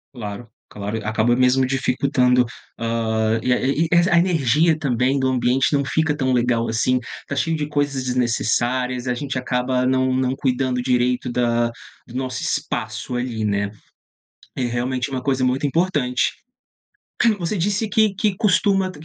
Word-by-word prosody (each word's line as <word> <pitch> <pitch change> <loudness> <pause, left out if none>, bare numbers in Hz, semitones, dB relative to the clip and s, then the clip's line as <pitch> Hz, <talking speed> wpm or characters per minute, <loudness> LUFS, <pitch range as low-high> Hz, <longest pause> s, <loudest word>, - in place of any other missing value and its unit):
Claro, 105 0 -7 0.2
claro, 105 +2 -4
acaba 110 +3 +2
mesmo 130 +1 +3
dificultando, 125 -1 +2 0.3
hã, 115 -1 0
e 125 - +1
a 125 - +3
e 145 +5 +1
e 170 +1 +4
a 170 - +4
energia 160 -2 +3
também 130 -1 +1
do 130 - +1
ambiente 130 +2 +1
não 140 -1 +2
fica 160 +2 0
tão 130 -3 0
legal 120 -2 +1
assim, 125 +3 +1 0.2
está 140 - -6
cheio 165 +3 0
de 150 - -2
coisas 145 -3 -1
desnecessárias, 125 +1 0
a - - +2
gente 135 +1 -4
acaba 125 0 0
não 130 0 +2
não 130 0 +1
cuidando 130 -2 0
direito 125 0 +1
da 120 -1 +1 0.4
do 120 - -12
nosso 130 0 -3
espaço 110 +1 -3
ali, 120 -3 -3
né. 100 -1 0 0.9
É 130 - -2
realmente 125 +2 -2
uma 130 -1 -2
coisa 130 -1 0
muito 130 +3 +1
importante. 145 -5 +1 1.1
Você 175 +3 -2
disse 205 +5 0
que 215 -2 +2
que 205 -1 0
costuma 195 -2 +2
130 Hz, 155 wpm, -21 LUFS, 120-140 Hz, 1.1 s, e